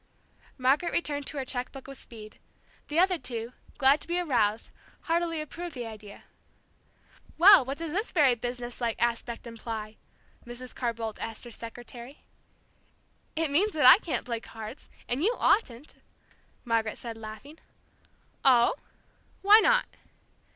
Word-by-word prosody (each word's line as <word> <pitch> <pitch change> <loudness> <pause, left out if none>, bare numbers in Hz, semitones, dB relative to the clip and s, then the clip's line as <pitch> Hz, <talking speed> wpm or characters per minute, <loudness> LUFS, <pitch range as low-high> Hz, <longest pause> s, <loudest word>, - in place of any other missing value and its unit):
Margaret 275 +6 +2
returned 290 -4 -1
to 300 - -5
her 270 - -2
cheque 250 -1 -4
book 270 -1 -11
with 275 - -9
speed. 215 -2 -12 0.5
The 300 - -3
other 365 0 +3
two, 240 -1 -1 0.2
glad 275 +2 +4
to - - -8
be 345 +1 0
aroused, 230 -10 0 0.3
heartily 335 -1 -1
approved 330 +2 -7
the 245 -2 -5
idea. 215 -2 -11 1.1
"Well, 385 0 +9
what 270 +3 -5
does 330 -2 -5
this 415 +8 -2
very 290 -7 +4
businesslike 240 -1 -4
aspect 235 0 -2
imply?" 225 -2 -7 0.5
Mrs. 245 +1 -9
Carr 240 -2 -1
Boldt 225 -2 -5
asked 225 -1 -4
her 240 - -10
secretary. 240 +3 -8 1.1
"It 320 -2 0
means 400 +9 +2
that 300 -5 +2
I 285 +9 +10
can't 300 - -3
play 235 -2 -3
cards, 225 +3 -10 0.2
and 245 +4 -1
you 460 +5 +2
oughtn't," 270 - +1 0.7
Margaret 225 -2 0
said, 230 -2 -7
laughing. 225 +8 -10 0.8
"Oh? 245 -3 +5 0.7
Why 415 +2 +8
not?" - - +3
255 Hz, 145 wpm, -28 LUFS, 230-315 Hz, 1.1 s, I